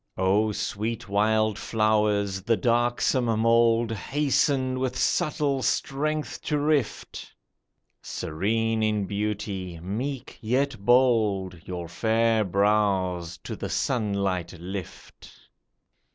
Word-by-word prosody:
O 100 Hz, +4 st, +2 dB
sweet 110 Hz, +3 st, -3 dB
wild 110 Hz, +1 st, +1 dB
flowers! 105 Hz, -3 st, +1 dB
the 115 Hz, +3 st, +1 dB
darksome 120 Hz, +3 st, +1 dB
mould 115 Hz, 0 st, +3 dB
Hasten 130 Hz, +1 st, 0 dB
with 130 Hz, -1 st, -2 dB
subtle 140 Hz, 0 st, +1 dB
strength 150 Hz, +5 st, -1 dB
to 150 Hz, -, 0 dB
rift; 145 Hz, -5 st, -1 dB, 0.7 s
Serene 110 Hz, +7 st, -1 dB
in 105 Hz, -2 st, +1 dB
beauty, 100 Hz, -3 st, -3 dB
meek 120 Hz, -, -5 dB
yet 130 Hz, +4 st, 0 dB
bold, 110 Hz, -8 st, +2 dB
Your 90 Hz, -2 st, -5 dB
fair 110 Hz, +4 st, +1 dB
brows 95 Hz, -3 st, +1 dB
to -, -, -5 dB
the -, -, -5 dB
sunlight 100 Hz, -7 st, -1 dB
lift 95 Hz, +1 st, -8 dB
110 Hz, 95 wpm, -26 LUFS, 100-120 Hz, 0.7 s, mould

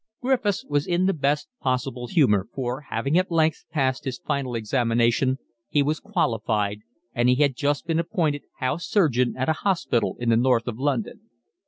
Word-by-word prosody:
Griffiths 245 Hz, -6 st, 0 dB
was 145 Hz, 0 st, 0 dB
in 175 Hz, +1 st, +1 dB
the 195 Hz, -, +3 dB
best 145 Hz, -1 st, 0 dB
possible 130 Hz, -2 st, -2 dB
humour, 120 Hz, -, +3 dB
for, 130 Hz, 0 st, -3 dB
having 150 Hz, +6 st, +1 dB
at 185 Hz, -, -1 dB
length 160 Hz, -2 st, +1 dB
passed 130 Hz, -4 st, 0 dB
his 130 Hz, -2 st, -3 dB
final 140 Hz, -5 st, -2 dB
examination, 120 Hz, +2 st, +1 dB, 0.3 s
he 145 Hz, -, +3 dB
was 150 Hz, +2 st, -1 dB
qualified, 110 Hz, -, -1 dB, 0.3 s
and 120 Hz, +1 st, +2 dB
he 125 Hz, -, +5 dB
had 140 Hz, -1 st, +2 dB
just 145 Hz, +3 st, 0 dB
been 165 Hz, -1 st, 0 dB
appointed 165 Hz, -4 st, 0 dB, 0.2 s
house 145 Hz, +6 st, -2 dB
surgeon 125 Hz, -, +2 dB
at 130 Hz, -, -1 dB
a 160 Hz, -, +3 dB
hospital 170 Hz, -, 0 dB
in 120 Hz, -1 st, -1 dB
the 115 Hz, -, +5 dB
North 120 Hz, -1 st, +2 dB
of 120 Hz, -1 st, -4 dB
London. 210 Hz, -, -2 dB
140 Hz, 175 wpm, -24 LUFS, 120-160 Hz, 0.3 s, he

